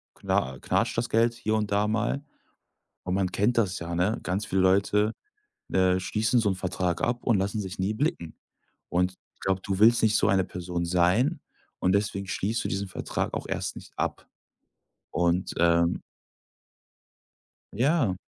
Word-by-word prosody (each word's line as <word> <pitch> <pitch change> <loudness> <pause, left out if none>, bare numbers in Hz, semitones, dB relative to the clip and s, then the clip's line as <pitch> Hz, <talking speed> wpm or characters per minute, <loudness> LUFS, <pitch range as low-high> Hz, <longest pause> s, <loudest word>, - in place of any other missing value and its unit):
kna 65 0 -1
knatscht - - 0
das 120 - 0
Geld 115 +1 +3
hier 110 -1 -1
und 105 -1 -1
da 105 +1 +2
mal 115 +6 0 0.8
und 90 0 -1
man 95 -1 +1
kennt 110 +6 +1
das 95 -5 +1
ja, 85 0 -5
ne, 95 +6 +1
ganz 100 +4 -1
viele 95 0 +1
Leute, 100 +3 +3 0.6
äh, 95 -1 +3
schließen 110 +6 +1
so 105 - +2
'n 95 - 0
Vertrag 90 -1 -2
ab 120 0 -1
und 115 -6 +3
lassen 100 +2 -1
sich 95 -1 -6
nie 100 +3 0
blicken. 110 - -2 0.5
Und 90 +1 +1 0.2
ich - - -39
glaube, 95 0 0
du 95 0 -2
willst 115 +2 +6
nicht 110 -1 +4
so - - +2
eine 95 -2 +3
Person 90 -1 -4
sein 90 - +2 0.4
und 90 - +2
deswegen 100 -1 -1
schließt 105 +3 -1
du - - -2
diesen 100 +2 -2
Vertrag 90 - -3
auch - - -4
erst - - -3
nicht - - -12
ab - - -3 0.8
und, 85 +1 0
ähm 85 0 +3 1.7
Ja. 130 - +2
95 Hz, 165 wpm, -27 LUFS, 90-110 Hz, 1.7 s, willst